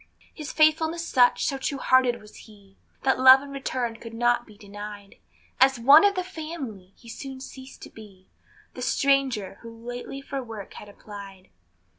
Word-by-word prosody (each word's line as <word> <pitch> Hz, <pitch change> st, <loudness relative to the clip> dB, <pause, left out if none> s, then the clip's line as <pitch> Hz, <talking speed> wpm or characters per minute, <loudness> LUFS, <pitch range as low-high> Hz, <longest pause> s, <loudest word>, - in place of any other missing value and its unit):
His 305 Hz, -1 st, -7 dB
faithfulness 320 Hz, +2 st, +2 dB
such, 245 Hz, -1 st, +3 dB
so 275 Hz, -, -2 dB
true 280 Hz, +1 st, -3 dB
hearted 255 Hz, -2 st, +2 dB
was 210 Hz, -1 st, -16 dB
he, 200 Hz, -3 st, -17 dB, 0.3 s
That 265 Hz, -1 st, +2 dB
love 260 Hz, +1 st, +8 dB
in 280 Hz, -, -10 dB
return 255 Hz, -4 st, -3 dB
could 230 Hz, 0 st, -10 dB
not 240 Hz, +1 st, +1 dB
be 210 Hz, -2 st, -16 dB
denied; 205 Hz, -1 st, -10 dB, 0.4 s
As 265 Hz, -1 st, +4 dB
one 275 Hz, +6 st, +8 dB
of 405 Hz, 0 st, +3 dB
the 365 Hz, -, -1 dB
family 310 Hz, -, -8 dB
he 235 Hz, -, -18 dB
soon 265 Hz, +3 st, -8 dB
ceased 260 Hz, 0 st, -11 dB
to -, -, -10 dB
be 195 Hz, -4 st, -15 dB, 0.5 s
The -, -, -9 dB
stranger, 270 Hz, -7 st, 0 dB
who 230 Hz, -, -10 dB
lately 245 Hz, +3 st, -8 dB
for 275 Hz, 0 st, -5 dB
work 225 Hz, -5 st, -9 dB
had 210 Hz, -, -11 dB
applied. 200 Hz, -, -12 dB
245 Hz, 170 wpm, -25 LUFS, 210-275 Hz, 0.5 s, love